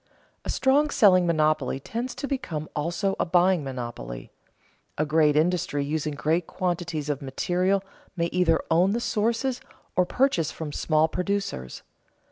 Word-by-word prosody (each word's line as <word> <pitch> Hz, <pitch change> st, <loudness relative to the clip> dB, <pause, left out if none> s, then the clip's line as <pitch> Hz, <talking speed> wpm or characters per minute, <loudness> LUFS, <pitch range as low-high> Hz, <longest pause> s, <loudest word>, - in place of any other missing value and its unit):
_ -, -, -44 dB, 0.4 s
A -, -, -8 dB
strong 285 Hz, +3 st, +3 dB
selling 185 Hz, -9 st, +5 dB
monopoly 155 Hz, -5 st, +1 dB
tends 235 Hz, -, -5 dB
to 280 Hz, -, -4 dB
become 165 Hz, -, -3 dB
also 175 Hz, +6 st, -1 dB
a -, -, +3 dB
buying 180 Hz, -1 st, +3 dB
monopoly. 120 Hz, -, -6 dB, 0.7 s
A 155 Hz, -, +1 dB
great 155 Hz, -1 st, +3 dB
industry 155 Hz, -3 st, +1 dB
using 150 Hz, 0 st, -2 dB
great 160 Hz, +6 st, 0 dB
quantities 175 Hz, -4 st, -2 dB
of 145 Hz, -2 st, -2 dB
materials 180 Hz, +8 st, 0 dB, 0.3 s
may 170 Hz, -2 st, 0 dB
either 175 Hz, -3 st, +3 dB
own 180 Hz, +5 st, +4 dB
the 235 Hz, -, 0 dB
sources 235 Hz, +3 st, -1 dB, 0.3 s
or 180 Hz, -1 st, +3 dB
purchase 215 Hz, -, +1 dB
from 155 Hz, -2 st, -6 dB
small 155 Hz, +1 st, +2 dB
producers. 180 Hz, -, -3 dB
170 Hz, 145 wpm, -26 LUFS, 150-195 Hz, 0.7 s, selling